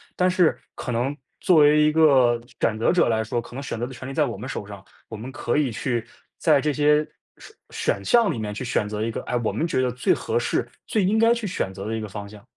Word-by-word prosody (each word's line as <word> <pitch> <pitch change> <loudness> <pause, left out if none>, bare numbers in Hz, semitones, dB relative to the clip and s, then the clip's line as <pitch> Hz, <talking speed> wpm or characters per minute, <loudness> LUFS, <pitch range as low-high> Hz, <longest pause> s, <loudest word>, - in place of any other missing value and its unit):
但 180 0 +2
是 180 -3 +3 0.2
可 125 - -4
能 130 +5 -1 0.3
作 180 -3 +4
为 150 0 +6
一 150 0 +4
个 135 -7 +4 0.2
选 110 -1 +1
择 115 - +3
者 175 -6 +3
来 110 -1 +1
说， 120 +2 -2
可 - - -14
能 135 - -4
选 130 - -5
择 120 - -1
的 130 - -8
权 130 +1 -9
利 - - -6
在 150 0 +2
我 115 - -4
们 120 +6 -7
手 105 - -5
上， 100 -2 -10 0.3
我 110 - -6
们 125 +5 -7
可 120 - -2
以 140 -5 +1
去 120 0 -2 0.4
在 150 -4 +4
这 150 - +1
些 150 +1 +3 0.3
选 - - -14 0.2
选 100 - -1
项 230 -6 +4
里 115 - -4
面 105 -1 -3
去 120 - -5
选 105 -3 0
择 105 0 -3
一 115 - -1
个， - - -4
哎， 125 - -3
我 - - 0
们 165 - -1
觉 130 - 0
得 125 -1 0
最 125 - 0
合 - - -1
适 - - -1 0.2
最 210 -3 +1
应 215 +4 +2
该 230 +1 +5
去 230 -3 -4
选 135 - -2
择 100 +1 -7
的 110 - -2
一 - - -3
个 110 - -5
方 100 0 -7
向。 105 -1 -13
130 Hz, 295 characters per minute, -24 LUFS, 110-155 Hz, 0.4 s, 为